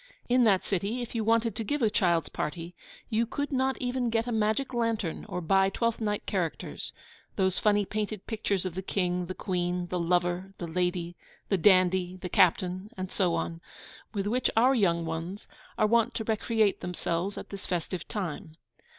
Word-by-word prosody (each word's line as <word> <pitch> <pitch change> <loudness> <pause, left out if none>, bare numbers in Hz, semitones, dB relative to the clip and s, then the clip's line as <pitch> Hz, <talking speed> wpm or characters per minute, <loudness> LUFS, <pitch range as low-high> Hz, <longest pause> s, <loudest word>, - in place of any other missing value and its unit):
In 245 0 +4
that 195 -4 +4
city, 205 +6 -1
if 240 - -8
you 230 -2 0
wanted 225 -1 +2
to 225 - -2
give 290 +4 -1
a 220 - +5
child's 175 -7 +2
party, 170 +3 -4 0.4
you 225 +1 +2
could 285 +4 -3
not 265 0 +1
even 250 -1 0
get 225 0 +1
a 245 - -3
magic 220 +5 +1
lantern 230 -7 -1
or 180 -1 -3
buy 195 +3 +4
Twelfth 230 +3 -1
Night 210 -1 -1
characters 175 -5 -3 0.4
those 190 -2 +1
funny 205 -1 +3
painted 210 0 -3
pictures 205 -4 -1
of 185 - -2
the 190 - -3
King, 180 -2 -1
the 185 - -5
Queen, 180 -2 -1
the 180 - -1
Lover, 175 +2 0
the 175 - -4
Lady, 175 0 -1 0.3
the 195 - +3
Dandy, 185 -1 +4
the 180 0 -6
Captain, 185 +1 +2
and 185 0 -4
so 180 -4 +1
on 165 0 -3 0.5
with 200 -3 -2
which 245 +5 +1
our 250 +4 +6
young 170 -8 +2
ones 165 +5 -4 0.3
are - - +4
wont 230 +1 +3
to 220 - -1
recreate 220 -1 +1
themselves 180 +2 -2
at - - -7
this 200 -1 -7
festive 175 -1 -3
time. 175 -4 -5
195 Hz, 185 wpm, -29 LUFS, 180-225 Hz, 0.5 s, our